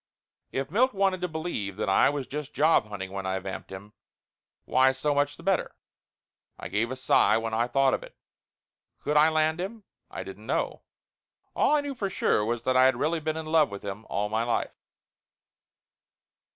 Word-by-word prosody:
If 135 +2 -3
Milt 250 +5 +2
wanted 190 -2 +1
to 180 - 0
believe 155 - -4
that 110 - -2
I 95 - +4
was 140 -2 -3
just 145 +1 -6
job 150 -7 +4
hunting 95 -3 -6
when 95 -1 -4
I 95 0 -1
vamped 95 0 -7
him, 100 +2 -10 0.7
why 130 0 +4
so 145 +3 0
much 145 +1 0
the - - -13
better. 195 -1 0 0.8
I - - -7
give 115 +3 0
a 130 - -4
sigh 130 -3 +3
when 115 0 -3
I 115 +2 +1
thought 135 +1 +3
of - - -1
it. - - -13 0.9
Could 150 - -1
I 150 +1 +6
land 155 +1 +1
him? 210 +3 -6 0.3
I - - -6
didn't - - -11
know. - - -1 0.7
All 300 - +3
I 295 - +2
knew 285 -1 -4
for 205 -6 -3
sure 105 - +1
was 115 +1 -2
that 130 +1 +1
I 130 0 +6
had 130 - +4
really 160 +3 0
been 155 +1 -2
in 160 - -5
love 155 -3 +3
with 100 0 -8
him 100 +2 -6
all 105 +1 -1
my 110 +2 -1
life. 120 0 -1
135 Hz, 195 wpm, -27 LUFS, 110-160 Hz, 0.9 s, I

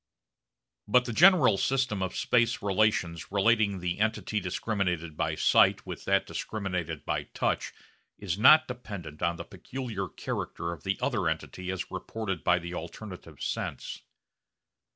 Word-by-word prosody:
But 125 +4 +4
the 120 - -3
general 165 - +6
system 125 -4 0
of 95 -1 -2
space 120 -2 +2
relations 95 -5 +1
relating 105 0 +3
the 90 0 -3
entity 110 0 0
discriminated 90 -4 -2
by - - -1
sight - - +4
with - - -7
that - - +2
discriminated 90 -7 -4
by - - -2
sight - - 0 0.5
is 95 -4 -2
not 155 +9 +7
dependent 105 - -7
on 85 0 +1
the - - -7
peculiar 115 -7 -5
character 85 0 -4
of 85 - -8
the 95 0 -1
other 115 -11 +1
entity 90 +3 -5
as 95 -1 -4
reported 105 -6 -4
by 90 - +4
the 85 0 -6
alternative 85 -2 -8
sense. - - -4
100 Hz, 140 wpm, -29 LUFS, 90-115 Hz, 0.5 s, not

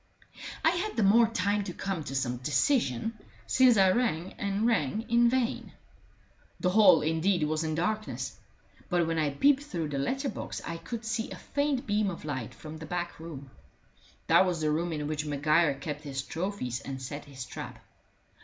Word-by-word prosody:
I 325 - +6
had 370 +5 -2
the 225 - +3
more 225 +4 +6
time 205 -2 0
to 180 - -5
come 195 -5 -3
to 135 - -5
some 125 -2 -1
decision, 150 - +1 0.3
since 255 -3 +5
I 190 -1 +6
rang 185 -6 0
and 200 +2 0
rang 220 - +1
in 235 0 +5
vain. 250 -1 -1 0.9
The 180 - +1
hall, 190 -5 +6
indeed, 160 +3 +1
was 155 +1 0
in 155 -1 -1
darkness; 215 +6 -2 0.5
but 175 -3 +2
when 165 0 -1
I 150 -2 +2
peeped 275 - +3
through 170 - -4
the 140 -2 -2
letter 270 - -1
box - - -5
I 170 - -4
could 220 +8 -6
see 225 0 -2
a - - -7
faint 285 -2 -1
beam 205 -1 +1
of 170 -4 -7
light 130 -6 -4
from 155 0 -9
the 160 0 -9
back 175 0 -4
room. 140 -5 -9 0.7
That - - +6
was 175 -2 -1
the 155 -1 +1
room 170 +3 0
in 150 -2 -3
which 150 0 -2
Maguire 150 +1 +2
kept 150 +2 -5
his 135 -3 -4
trophies 160 - -3
and 135 -1 -6
set 145 +3 -6
his 135 -3 -8
trap. - - -7
170 Hz, 185 wpm, -29 LUFS, 150-220 Hz, 0.9 s, I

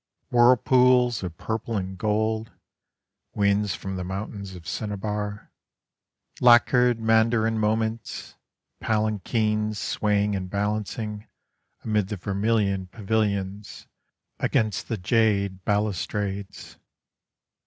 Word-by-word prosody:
Whirlpools 125 0 +4
of 90 -3 -6
purple 110 0 -3
and 95 0 -4
gold, 110 +3 -1 0.9
Winds 100 0 +2
from 95 -1 -5
the 90 - -3
mountains 100 +1 -6
of 85 -2 -11
cinnabar, 105 +1 -4 0.9
Lacquered 125 0 +5
mandarin 110 0 +2
moments, 110 +1 -2 0.4
palanquins 110 0 0
swaying 105 -1 0
and 95 -1 -4
balancing 105 +1 -3 0.6
Amid 105 -3 0
the 105 - -4
vermilion 100 0 0
pavilions, 100 -1 -2 0.5
against 110 -2 0
the 115 - -2
jade 100 -2 +1
balustrades. 100 -1 -2
105 Hz, 90 wpm, -25 LUFS, 100-110 Hz, 0.9 s, Lacquered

